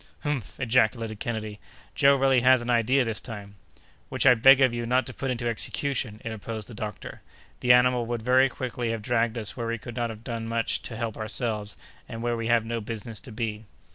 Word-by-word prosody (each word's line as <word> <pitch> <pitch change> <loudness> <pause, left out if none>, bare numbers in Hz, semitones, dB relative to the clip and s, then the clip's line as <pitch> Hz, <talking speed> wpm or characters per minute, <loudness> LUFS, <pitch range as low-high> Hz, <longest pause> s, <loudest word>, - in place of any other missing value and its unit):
"Humph!" 145 - -4
ejaculated 115 -3 +1
Kennedy, 110 -3 -4 0.3
"Joe 140 0 +5
really 135 -2 +3
has 130 0 +5
an 120 - -1
idea 120 +3 +3
this 110 -5 -2
time—" 100 -2 -8 0.6
"Which - - -1
I 130 - +9
beg 135 +3 +7
of 130 -3 +4
you 120 -1 -3
not 125 +2 +2
to 130 - -8
put 135 - -4
into 120 -1 -2
execution," 115 -1 -2
interposed 110 -1 -5
the 120 - -9
doctor. 105 0 -7 0.4
"The 125 - +3
animal 125 -1 +4
would 120 -2 -3
very 130 +2 +4
quickly 125 -2 -4
have 115 -2 -3
dragged 115 0 0
us 110 -3 -3
where 115 -2 -4
we 115 0 -1
could 120 +1 -9
not 120 -1 -1
have 110 0 -9
done 115 -2 -4
much 115 0 -1
to 115 - -7
help 115 -2 -3
ourselves, 110 -2 -3 0.3
and 115 0 -6
where 120 0 0
we 115 -1 -3
have 115 -1 +3
no 115 0 -3
business 110 0 -5
to 125 - -11
be." 110 -1 -4
115 Hz, 210 wpm, -26 LUFS, 110-125 Hz, 0.6 s, I